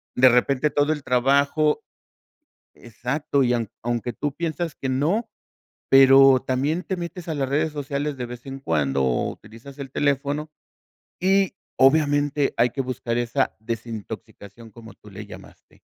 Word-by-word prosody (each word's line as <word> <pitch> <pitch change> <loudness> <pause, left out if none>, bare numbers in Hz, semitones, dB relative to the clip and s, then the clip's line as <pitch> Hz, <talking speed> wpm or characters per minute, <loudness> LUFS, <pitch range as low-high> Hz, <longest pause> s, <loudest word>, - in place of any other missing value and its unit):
de 130 +1 +7
repente 130 +4 +2
todo 145 +2 +2
el 150 -2 -8
trabajo 140 +4 +2 1.0
exacto, 135 +5 -2
y 125 -1 +2
a 115 -2 -1 0.2
aunque 120 0 -2
tú 145 +4 -3
piensas 165 -1 -3
que 135 - -5
no, 170 - 0 0.6
pero 135 0 +7
también 140 +7 -1
te 190 - -3
metes 170 0 -7
a 160 - -2
las 140 -2 -1
redes 155 +3 0
sociales 145 0 -3
de 125 - -4
vez 120 +2 -10
en 135 0 -6
cuando, 70 - 0
o 65 -2 0
utilizas 115 +6 -13
el 135 -2 -7
teléfono 145 +2 -1 0.7
y 195 +1 +2 0.2
obviamente 145 0 +3
hay 120 +1 +4
que 135 - -3
buscar 125 -2 -3
esa 120 0 -1
desintoxicación 110 -1 -8
como 115 +1 -13
tú 105 - -17
le 105 +2 -9
llamaste. - - -15
135 Hz, 150 wpm, -23 LUFS, 120-150 Hz, 1.0 s, de